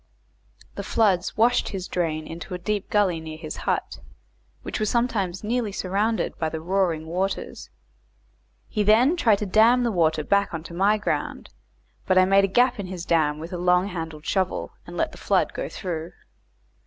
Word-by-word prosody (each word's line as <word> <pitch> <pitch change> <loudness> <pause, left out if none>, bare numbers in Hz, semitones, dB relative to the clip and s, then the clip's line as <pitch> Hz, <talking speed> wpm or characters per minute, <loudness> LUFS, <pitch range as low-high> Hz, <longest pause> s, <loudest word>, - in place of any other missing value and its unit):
The - - -5
floods 200 -5 +1
washed 240 +3 +3
his 190 -2 -5
drain 160 -3 -2
into 170 +3 -7
a - - -3
deep 205 +3 -3
gully 195 -5 +2
near 160 -1 -8
his 155 -1 -7
hut, - - -2 0.6
which - - -4
was 215 -1 0
sometimes 205 -7 -1
nearly 230 0 -1
surrounded 200 +4 -1
with 160 -1 -2
the 160 - -2
roaring 170 -2 0
waters. 185 +4 -3 1.0
He 210 - -2
then 225 - +5
tried 225 - +3
to 210 - -3
dam 225 +5 +4
the 235 - +1
water 160 -4 +1
back 200 +1 +1
on 160 - -5
to 170 - -10
my 200 +5 +3
ground, 210 - -3 0.6
but 185 - +3
I 185 - +7
made 195 +1 +4
a - - -1
gap 245 +4 +2
in 195 - -4
his 180 -2 -6
dam 155 -3 +2
with 165 +4 -8
a 175 - -3
long 180 +2 +3
handled 160 -4 -6
shovel, 190 -2 -1 0.2
and - - -8
let - - 0
the - - -13
flood - - +1
go - - -4
through. 170 -3 -5
190 Hz, 185 wpm, -24 LUFS, 170-210 Hz, 1.0 s, I